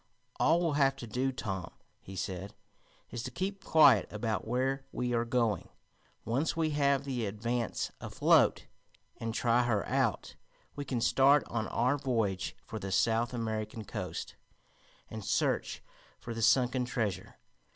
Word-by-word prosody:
"All 165 +2 +4
we'll 170 -3 +1
have 135 0 +4
to 135 - -8
do, 125 +4 -1
Tom," 95 -8 -4 0.3
he 95 - -11
said, 95 +1 -5 0.6
"is 120 - -4
to - - -5
keep 190 +2 -4
quiet 140 -9 +5
about 110 +1 -2
where 130 +3 0
we 125 0 -2
are 115 0 +1
going. 115 -3 0 0.6
Once 135 +9 0
we 160 -1 +1
have 140 -2 +2
the 125 -5 -2
Advance 115 +3 -2
afloat, - - +3 0.5
and 115 0 -3
try 120 +1 +2
her 120 -5 0
out, - - 0 0.4
we 145 - -5
can 125 -3 -2
start 135 +4 +5
on 115 -1 -3
our 130 +5 +1
voyage 110 -8 -1
for 110 - -6
the 95 -1 -5
South 115 +5 +2
American 110 -2 -3
Coast - - -5 0.7
and 110 -1 -7
search 110 +4 0 0.4
for 120 -2 -6
the 115 - -4
sunken 125 +2 +3
treasure. 115 -5 -3
120 Hz, 150 wpm, -31 LUFS, 110-135 Hz, 0.7 s, quiet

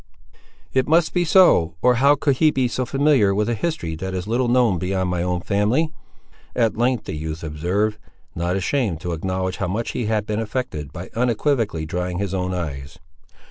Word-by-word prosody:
"It 130 -1 +2
must 160 +1 +3
be 180 - +2
so, 160 - +5
or 125 -1 +4
how 140 +1 +6
could 140 -3 0
he 155 - +5
be 130 -4 +1
so 125 +1 -3
familiar 135 -8 +3
with 105 +1 +1
a 120 - +1
history 110 - -3
that 95 +2 -4
is 90 0 -3
little 120 +4 0
known 120 -7 +3
beyond 95 +1 -1
my 90 -1 -1
own 90 0 -1
family," 110 - +1 0.6
at 115 -3 +2
length 120 +1 +1
the - - -6
youth 80 +1 -5
observed, 90 +8 -1 0.3
not 85 +2 -1
ashamed 95 - 0
to 90 - -3
acknowledge 95 +2 -2
how 95 - -2
much 110 +6 -2
he 120 - -3
had 110 -1 0
been 105 0 -2
affected, 105 - -4
by 85 +5 -8
unequivocally 115 - 0
drying 90 +1 -3
his 100 -1 -2
own 90 -1 -1
eyes. 75 -4 -5
105 Hz, 190 wpm, -22 LUFS, 90-125 Hz, 0.6 s, how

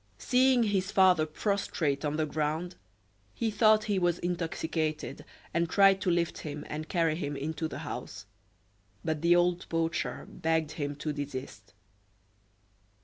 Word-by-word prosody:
Seeing 255 -1 +3
his 195 -3 0
father 185 -6 +4
prostrate 160 -5 -1
on 150 0 -1
the 155 - +1
ground, 155 +4 -2 0.6
he 225 -1 -1
thought 215 -1 +4
he 205 -3 0
was 175 -1 +2
intoxicated, 160 -3 -2 0.3
and 170 0 +1
tried 195 0 +5
to 185 - 0
lift 170 -1 0
him 150 -1 -6
and 155 +1 -5
carry 165 -3 +2
him 145 -4 -3
into 160 +3 -3
the - - -7
house, - - -6 0.8
but 155 -2 -1
the 170 +1 +5
old 175 0 +1
poacher 165 0 -1
begged 160 -3 -1
him 145 -1 -3
to 150 +1 -3
desist. 145 -2 -7
165 Hz, 145 wpm, -29 LUFS, 155-185 Hz, 0.8 s, tried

